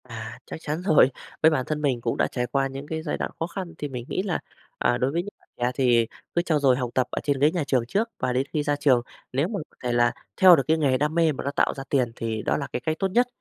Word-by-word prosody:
À, 115 -2 -8
chắc - - -7
chắn 155 +2 -3
rồi. 155 -8 +5 0.3
Với 160 - +8
bản 130 -5 0
thân 150 -1 -2
mình 130 -5 0
cũng 115 0 -1
đã - - +2
trải 125 -1 -2
qua 135 +1 +1
những 135 +2 -8
cái 160 0 -3
giai 155 - -2
đoạn - - -3
khó 165 - -1
khăn 180 -1 -6
thì 145 - -3
mình 125 -3 -6
nghĩ 185 - -1
là, 195 -4 -1 0.4
à, 120 - +2
đối 130 +2 0
với 170 +3 -1
những 205 - -9
bạn - - -31
trẻ 120 +1 0
thì 120 -4 +3 0.3
cứ 170 - +4
trau 160 -4 +1
dồi 130 -3 +4
học 125 -2 -2
tập 130 -1 +1
ở - - -2
trên 140 -2 0
ghế 150 +3 +4
nhà 175 -3 -1
trường 130 -4 +1
trước 220 - 0
và 125 -1 0
đến 130 +2 +1
khi 150 - 0
ra 145 0 +1
trường, 130 -4 +3 0.3
lếu 140 +6 +1
mà 205 0 -3 0.2
c - - -54
thể 125 - 0
là 120 0 +3 0.3
theo 185 -2 +10
được 135 - +1
cái 160 - +3
nghề 140 -4 +2
đam 150 +4 0
mê 165 -2 +4
mà 140 - -5
nó 140 - -1
tạo - - +1
ra 135 - -7
tiền 125 -4 +1
thì 110 -1 -3
đó - - +1
là 140 - -3
cái - - -1
cách 155 +5 -1
tốt 195 - +2
nhất. 245 +5 +3
140 Hz, 305 wpm, -25 LUFS, 125-160 Hz, 0.4 s, theo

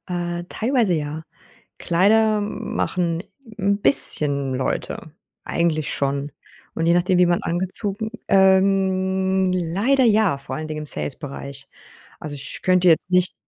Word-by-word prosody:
Äh, 175 -1 -4
teilweise 230 -5 0
ja. 155 0 -4 0.5
Kleider 210 +5 +2
machen 180 -4 -3 0.4
'n 200 0 0
bisschen 140 - +5
Leute 135 +4 -4 0.3
eigentlich 160 -3 -1
schon. 140 +1 -2 0.4
Und 165 - -2
je 170 - +4
nachdem, 180 +1 +1
wie 180 - +5
man 175 0 0
angezogen 195 +5 -3 0.2
ähm, 190 -1 +2
leider 200 +11 +1
ja, 210 -9 +2
vor 135 - -7
allen 155 0 -6
Dingen 155 0 -5
im 150 - -7
Sales 140 - -4
Bereich. 140 -2 -9 0.5
Also, 150 -1 -7
ich 140 - -8
könnte 185 -1 +3
jetzt 170 +2 +2
nicht 180 0 +1
180 Hz, 135 wpm, -21 LUFS, 155-195 Hz, 0.5 s, bisschen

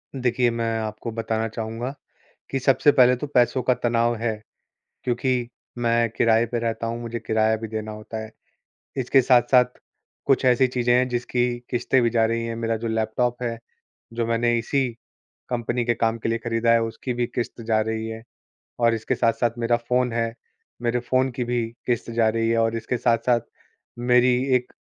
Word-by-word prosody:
देखिए, 125 -1 +1
मैं 115 -1 -1
आपको 110 +1 -5
बताना 115 0 -2
चाहूँगा, 115 +4 -5 0.6
कि 135 - -1
सबसे 135 +2 +4
पहले 125 -2 +5
तो 135 +4 -5
पैसों 125 -2 +2
का 125 +1 +3
तनाव 120 -1 +1
है, 110 -2 -2 0.6
क्योंकि 125 0 0 0.3
मैं 115 -1 +2
किराए 115 0 +4
पे 120 +1 -3
रहता 115 0 -2
हूँ, 115 +1 -4
मुझे 115 0 -4
किराया 110 0 +1
भी 110 0 -6
देना 110 0 -5
होता 105 +1 -7
है। 110 - -10 0.7
इसके 130 +1 +3
साथ-साथ 125 0 +4 0.5
कुछ 135 -1 +2
ऐसी 130 +1 +4
चीज़ें 120 -1 +1
हैं 125 +1 +3
जिसकी 120 0 0 0.2
किश्तें 125 +1 +1
भी 115 - +3
जा 115 -1 +2
रही 115 +1 -1
हैं। 115 0 -4
मेरा 115 0 -1
जो 115 +1 -4
लैपटॉप 115 +2 -1
है, 115 -1 -2 0.6
जो 115 0 -1
मैंने 120 +1 +1
इसी 130 +3 0 0.6
कंपनी 120 0 -1
के 120 0 +1
काम 115 0 0
के 115 - -3
लिए 115 0 0
ख़रीदा 115 0 +1
है, 115 0 +4
उसकी 115 +3 -4
भी 120 0 0
किश्त 120 0 -3
जा 110 -1 +2
रही 110 0 -2
है 110 0 -7 0.6
और 115 -1 +4
इसके 110 -1 -1
साथ-साथ 115 0 +1
मेरा 120 0 +2
फ़ोन 125 +1 0
है, 115 0 -1 0.5
मेरे 120 0 +1
फ़ोन 130 +2 +1
की 125 0 -3
भी 120 -1 0 0.2
किश्त 120 -1 -1
जा 115 -1 +2
रही 115 +1 0
है 115 - +2
और 115 0 +1
इसके 115 +2 -2
साथ-साथ 120 +1 +2 0.6
मेरी 125 +1 +4 0.2
1 125 0 -4
स - - -41
120 Hz, 185 wpm, -24 LUFS, 115-125 Hz, 0.7 s, पहले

